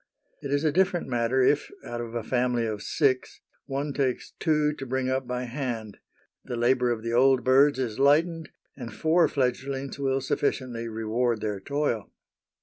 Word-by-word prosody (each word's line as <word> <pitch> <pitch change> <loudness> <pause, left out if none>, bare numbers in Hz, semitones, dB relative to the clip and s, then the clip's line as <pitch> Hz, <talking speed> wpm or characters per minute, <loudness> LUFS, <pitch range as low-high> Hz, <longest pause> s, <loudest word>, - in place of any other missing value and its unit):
It 140 - -5
is 145 +1 +1
a 155 - +3
different 180 0 +1
matter 125 +1 +1
if, 145 +3 +2 0.2
out 120 0 -4
of 120 0 -7
a 115 - -2
family 125 -1 0
of 105 -2 -3
six, 130 +1 0 0.3
one 140 +1 -3
takes 135 -3 -1
two 150 -2 +2
to 135 - -6
bring 130 +1 -1
up 130 -1 -1
by 125 0 -2
hand 120 -5 -5 0.4
the 120 - -5
labour 125 +1 +2
of 115 -2 -2
the 115 0 -2
old 130 +1 +4
birds 135 +2 +5
is 125 -3 -3
lightened, 160 +4 +3 0.3
and 120 -4 -7
four 160 +9 +3
fledglings 135 +1 -2
will 135 -1 +1
sufficiently 125 -3 -2
reward 115 +1 -1
their 105 -2 -2
toil. 140 -3 -2
130 Hz, 170 wpm, -26 LUFS, 120-140 Hz, 0.4 s, birds